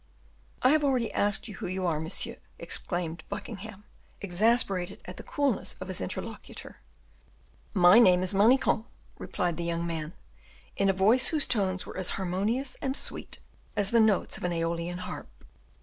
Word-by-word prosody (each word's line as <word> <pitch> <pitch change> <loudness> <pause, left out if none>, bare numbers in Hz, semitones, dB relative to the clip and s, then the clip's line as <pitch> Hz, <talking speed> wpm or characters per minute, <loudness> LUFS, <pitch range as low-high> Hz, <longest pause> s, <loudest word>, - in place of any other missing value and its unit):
"I 255 - +6
have 305 0 +3
already 255 -5 +1
asked 205 +2 +1
you 205 -3 -9
who - - -4
you 185 +1 -2
are, 160 -3 0
monsieur," 160 +1 -1 0.2
exclaimed 170 -2 -2
Buckingham, 210 -1 -7 0.4
exasperated 200 -1 +1
at 180 - -8
the - - -7
coolness 285 -2 -1
of - - -7
his - - -5
interlocutor. - - -7 0.9
"My 180 +3 +7
name 185 -6 +6
is 185 - 0
Manicamp," 225 +2 +3 0.3
replied 175 -2 -2
the 170 - -3
young 170 0 -2
man, 160 -1 -4 0.6
in 195 0 +2
a - - +6
voice 215 +7 +4
whose 310 -3 +1
tones 190 -5 0
were - - -8
as 185 -1 +2
harmonious 205 +8 -1
and 270 +1 -1
sweet - - -4 0.3
as 200 -1 +2
the 235 - +5
notes 215 -3 +2
of - - -11
an 180 -1 0
Aeolian 170 +1 -2
harp. 180 - -7
190 Hz, 165 wpm, -28 LUFS, 175-225 Hz, 0.9 s, My